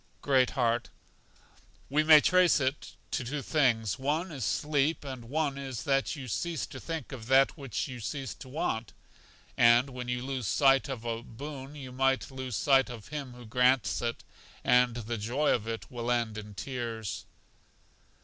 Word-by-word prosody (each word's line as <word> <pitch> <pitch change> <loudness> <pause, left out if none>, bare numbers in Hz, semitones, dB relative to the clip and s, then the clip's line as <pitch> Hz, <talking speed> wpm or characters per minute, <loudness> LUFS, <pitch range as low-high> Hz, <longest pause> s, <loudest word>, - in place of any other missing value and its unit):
Great 130 -3 +4
heart: 120 -2 +1 1.0
We 150 +3 +2
may 155 -1 +8
trace 185 -1 +4
it 135 +1 -2 0.2
to - - -1
two 140 +3 -4
things; 120 - +1
one 155 +7 -1
is 135 -6 -5
sleep, 150 +7 +1
and 130 -4 -7
one 140 +1 -1
is 135 -4 -5
that 135 +2 +1
you 135 -4 -7
cease 165 +8 -2
to - - -9
think 160 -6 -5
of 120 -5 -8
that 135 +1 +5
which 135 - -3
you 125 -2 -7
cease 135 +4 -4
to 130 - -12
want; 120 -6 -2 0.6
and 120 +3 +5
when 125 -1 -6
you 125 +1 -2
lose 130 -5 -3
sight 135 +3 +4
of 120 -4 -5
a 115 -1 -2
boon 135 +4 -8
you 135 -3 -8
lose 130 -1 -1
sight 135 +1 +4
of 115 -4 -9
Him 140 -4 -5
who 125 -1 -11
grants 125 +2 +2
it, 120 -1 -3 0.4
and 125 -1 +4
the 115 -1 -4
joy 125 +8 +1
of 110 -2 -2
it 115 0 -5
will 120 -1 -4
end 120 -3 0
in 105 -1 -8
tears. 115 -4 -4
130 Hz, 170 wpm, -30 LUFS, 120-140 Hz, 1.0 s, may